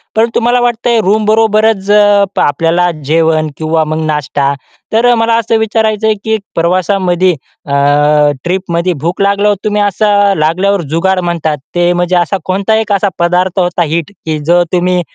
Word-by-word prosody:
परंतु 230 +1 +1
मला 240 +1 +2
वाटतंय, 235 -1 0
रूमबरोबरच 215 0 +1
अ, 205 -1 +4 0.2
आपल्याला 165 +4 +1 0.2
जेवण 160 0 +1
किंवा 160 0 0
मग 155 +1 -3
नाश्ता, 145 -2 -1 0.4
तर 240 +2 +3
मला 230 0 +1
असं 230 0 0
विचारायचंय 220 0 0
की 220 -1 0 0.2
प्रवासामध्ये 185 +1 +1 0.3
अ, 140 - -4 0.7
ट्रिपमध्ये 180 -1 -1
भूक 175 +3 -2
लागल्यावर 200 +1 +2
तुम्ही 210 -1 0
असं, 205 0 +2
लागल्यावर 185 +5 +1
जुगाड 190 +2 +1
म्हणतात 170 -3 -2 0.2
ते, 175 0 +2
म्हणजे 175 +1 0
असा 175 +2 +1
कोणता 195 +4 0
एक 220 -1 -3
असा 200 0 +1
पदार्थ 180 +2 0
होता 175 -1 0
हिट, 165 +3 -3
की 155 -1 -2
जो 175 +2 +3
तुम्ही 180 0 +1
185 Hz, 145 wpm, -11 LUFS, 170-210 Hz, 0.7 s, अ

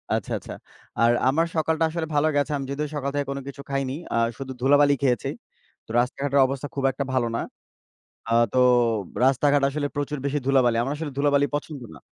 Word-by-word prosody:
আচ্ছা, - - -4
আচ্ছা। - - -9 0.5
আর 115 0 +5 0.2
আমার 160 +5 +2
সকালটা 160 0 +1
আসলে 160 0 -3
ভালো 145 +2 +3
গেছে। 145 +1 +1
আমি 135 - -4
যদিও 140 +2 -2
আমি - - -14
সকাল 140 -1 -2
থেকে 145 0 0
কোনো 140 0 -4
কিছু 140 0 -8
খাইনি, 135 -1 -1 0.2
আ - - +1 0.2
শুধু 135 -1 -6
ধুলাবালি 145 +2 +5
খেয়েছি। 125 -4 +1 0.6
তো, - - -32
রাস্তাঘাটের 140 +3 0
অবস্থা 135 +1 -4
খুব 135 - -2
একটা 135 +2 -3
ভালো 125 -2 +1
না। - - -1 0.9
আ - - +1 0.2
তো - - +1 0.7
রাস্তাঘাট 140 +2 +3
আসলে 145 +1 -2
প্রচুর 145 +1 -2
বেশি 140 +1 0
ধুলাবালি। 130 -4 +3
আমার 135 +4 -2
আসলে 150 -2 -5
ধুলাবালি 145 0 +3
পছন্দ 145 -1 -4
না। 70 - -14
140 Hz, 195 wpm, -24 LUFS, 135-145 Hz, 0.9 s, আর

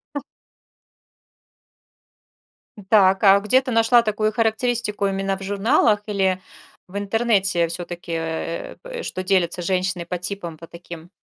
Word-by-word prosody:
У. 285 - -2 2.7
Так, 195 -2 +4
а 195 0 +7
где 230 +6 +3
ты 255 -1 -5
нашла 230 +1 +5
такую 215 -1 -1
характеристику 225 -2 0
именно 195 0 -2
в 195 - -9
журналах 205 +1 +2
или 190 -3 0 0.5
в 190 - -7
интернете 200 -4 +1
всё-таки, 175 0 -7
э, 165 0 -4
п - - -12
э, - - -5
что 185 - -4
делятся 185 -2 +1
женщины 185 -1 -1
по 180 +1 -3
типам, 180 -3 -6
по 165 +1 -12
таким? 170 0 -11
195 Hz, 135 wpm, -22 LUFS, 175-215 Hz, 2.7 s, а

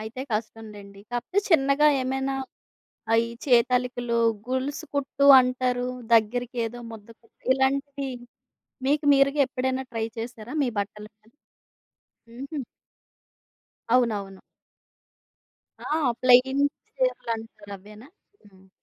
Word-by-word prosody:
అయితే 220 +4 -7
కష్టం 225 +1 -4
లెండి. 200 -1 -13
కాకపోతే 245 +11 -2
చిన్నగా 280 -1 +4
ఏమైనా 265 +1 -2 0.8
అయి 230 +1 +3 0.2
చేతాలికలు, 245 -1 +2 0.3
గొలుసు 260 +3 -3
కుట్టు 280 0 0 0.2
అంటారు. 250 0 -1 0.3
దగ్గరికి 245 +3 +1
ఏదో 240 +2 -7
ముద్దకుట్టు, 225 +1 -15
ఇలాంటివి 275 +1 -1 0.8
మీకు 295 +2 +1
మీరుగా 275 +1 +3
ఎప్పుడైనా 260 0 -2
ట్రై 225 -1 -2
చేశారా? 230 0 -7
మీ 265 - +1
బట్టలు 210 +1 -5
పై 215 - -27 1.0
హుహు. 275 +4 -7 1.3
అవునవును. 205 -6 0 1.5
ఆ! - - -5 0.3
ప్లెయిన్ 255 +2 +5 0.3
చీరలంటారు 225 - -3
అవేనా? 210 +6 -14 0.4
హ్మ్. 190 -1 -22
250 Hz, 95 wpm, -25 LUFS, 225-270 Hz, 1.5 s, ప్లెయిన్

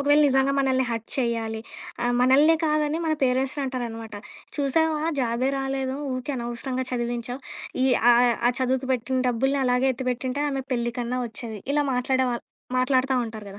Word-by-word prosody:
ఒకవేళ 290 +1 +4
నిజంగా 270 +1 +3
మనల్ని 260 -1 +2
హర్ట్ 230 -1 -4
చేయాలి, 225 -2 -1 0.4
ఆహ్, 245 0 +1
మనల్నే 285 +6 +5
కాదని 305 +1 +1
మన 315 - +2
పేరెంట్స్‌ని 260 +3 0
అంటారనమాట, 230 -4 -5 0.4
"చూసావా 305 +2 +1 0.2
జాబే 245 +2 0
రాలేదు 270 0 -2 0.2
ఊరికే 255 +2 -3
అనవసరంగా 245 +2 -3
చదివించావు, 240 +1 -3 0.4
ఈ - - +4 0.3
ఆహ్, 240 0 +5 0.2
ఆ - - +5
చదువుకు 260 +1 0
పెట్టిన 255 +1 -1
డబ్బుల్ని 270 +4 +1
అలాగే 250 +1 +2
ఎత్తిపెట్టుంటే 255 +2 -2
ఆమె 270 -1 -2
పెళ్లి 240 -1 -1
కన్నా 245 +1 -2
వచ్చేది." 225 -2 -7
ఇలా 295 0 +2
మాట్లాడే 260 +1 +1
వాళ్ళు 235 - -5 0.3
మాట్లాడతా 260 +1 +2
ఉంటారు 220 -1 -8
కదా! 200 - -11
255 Hz, 155 wpm, -25 LUFS, 240-270 Hz, 0.4 s, మనల్నే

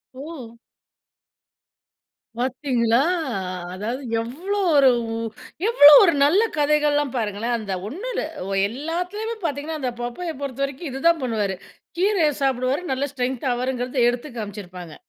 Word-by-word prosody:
ஓ! 260 -5 -9 1.8
பார்த்தீங்களா? 250 -2 +1 0.7
அதாவது 225 +8 -4 0.2
எவ்ளோ 340 - -3 0.2
ஒரு 275 -2 +7 0.8
எவ்ளோ 300 -11 +9
ஒரு 340 -4 +4
நல்ல 325 +9 +4 0.2
கதைகள்லாம் 295 -2 +2
பாருங்களேன். 225 +2 -1
அந்த 210 -4 -4
ஒண்ணு 360 - -6
இல்ல - - -1 0.3
ஒ - - -4 0.2
எல்லாத்துலயுமே 360 - -4
பார்த்தீங்கனா, 300 +1 -3
அந்த 255 -3 -2
பப்பய 315 +8 -4
பொறுத்தவரைக்கும் 275 +3 -4
இது 265 - -5
தான் 335 -2 +3
பண்ணுவாரு. 210 -6 -1 0.4
கீரைய 370 -4 +3
சாப்பிடுவாரு 265 +2 +1
நல்ல 265 +2 0
ஸ்ட்ரென்த் 260 -1 -2
ஆவாருங்கிறது 250 0 0
எடுத்து 245 +5 -4
காமிச்சிருப்பாங்க. 185 -6 -7
265 Hz, 115 wpm, -23 LUFS, 240-305 Hz, 1.8 s, எவ்ளோ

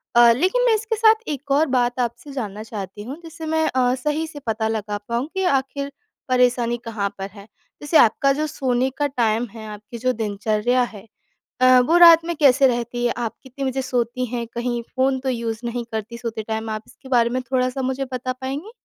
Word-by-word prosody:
अ, 240 0 +8
लेकिन 375 - +1
मैं 475 - +4
इसके 450 +1 -2
साथ 440 0 +4
एक 285 -1 -5
और 290 +3 +4
बात 245 0 0
आपसे 240 +3 -3
जानना 215 -5 -5
चाहती 205 -2 -7
हूँ, 260 +7 -7
जिससे 325 0 -8
मैं 320 0 +1
अ, 250 -1 +2
सही 300 +4 -2
से 310 -2 -9
पता 220 0 0
लगा 215 -2 -2
पाऊँ 235 +4 -1
कि 380 - -1
आख़िर 280 -3 0 0.4
परेशानी 245 -1 +2
कहाँ 215 -3 -2
पर 195 0 -5
है। 200 -1 -12 0.4
जैसे 295 +2 +3
आपका 275 +4 +4
जो 300 +2 -1
सोने 260 -3 0
का 290 - +1
टाइम 235 -3 0
है, 220 0 -9
आपकी 210 +2 -9
जो 255 +2 0
दिनचर्या 215 +3 0
है 215 -4 -8 0.6
अ, 255 0 +7
वो 315 +8 +3
रात 335 -1 +9
में 340 0 -2
कैसे 275 -2 +5
रहती 240 0 -2
है, 240 - +2
आप 235 -2 -2
कितने 270 +1 -6
बजे 265 0 -1
सोती 250 -1 -1
हैं, 240 -1 -2
कहीं 240 0 -2
फोन 265 0 +2
तो 265 +1 -2
यूज़ 230 -3 -2
नहीं 240 0 -3
करती 220 +1 -5
सोते 230 -2 -4
टाइम 220 0 -3
आप, 215 0 -4
इसके 265 - -16
बारे 235 -2 +3
में 255 +2 -1
थोड़ा-सा 255 +1 -1
मुझे 265 +1 -2
बता 255 0 -2
पाएँगी? 280 +10 -4
250 Hz, 205 wpm, -22 LUFS, 230-275 Hz, 0.6 s, रात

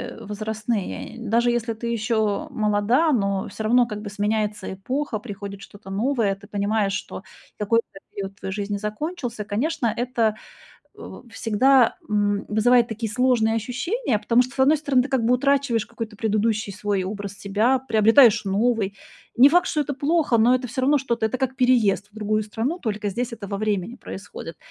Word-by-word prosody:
э, - - -11
возрастные, 215 - -4
даже 235 +2 +1
если 235 -1 -1
ты 230 +2 -6
ещё 220 -2 0
молода, 225 +6 +2
но 200 -6 0
всё 220 - -6
равно 245 +2 +4
как 210 -3 -6
бы 205 - -6
сменяется 210 -1 -2
эпоха, 250 +5 -3
приходит 200 -3 -8
что-то 195 -1 -12
новое, 225 0 +1
ты 200 +1 -16
понимаешь, 205 -1 0
что - - -5 0.4
какой-то 210 -1 0
период 195 -1 -5
в 195 - -29
твоей 190 - -5
жизни 205 +1 -3
закончился. 230 - -4
Конечно, 235 +3 -1
это, 235 -3 0 0.6
у 245 - -11
всегда, 240 +4 +3
м, 205 -1 +1
вызывает 235 +3 +4
такие 225 0 -4
сложные 245 -2 +2
ощущения, 255 - -1
потому 235 +3 +3
что, 255 +2 -8
с - - -16
одной 275 +4 +5
стороны, 280 -4 +2
ты - - -5
как 260 -4 0
бы 245 +2 +4
утрачиваешь 275 -3 +1
какой-то 225 -2 -7
предыдущий 215 -1 0
свой 205 -1 -2
образ 200 +1 -5
себя, 215 +6 +1
приобретаешь 225 -1 +5
новый. 200 0 0 0.4
Не 260 +4 +8
факт, 355 +4 +3
что 305 - 0
это 285 0 -4
плохо, 290 -1 +1
но 230 +3 +4
это 255 0 +1
всё 250 +2 -4
равно 285 +3 +3
что-то. 235 -4 -1
Это 220 +4 -3
как 265 0 -1
переезд 240 -6 +2
в - - -32
другую 215 0 0
страну, 225 - -3
только 210 -3 -2
здесь 240 +5 -3
это 225 -3 -7
во 200 0 -3
времени 210 0 -2
происходит. 195 -8 -9
225 Hz, 175 wpm, -23 LUFS, 205-250 Hz, 0.6 s, Не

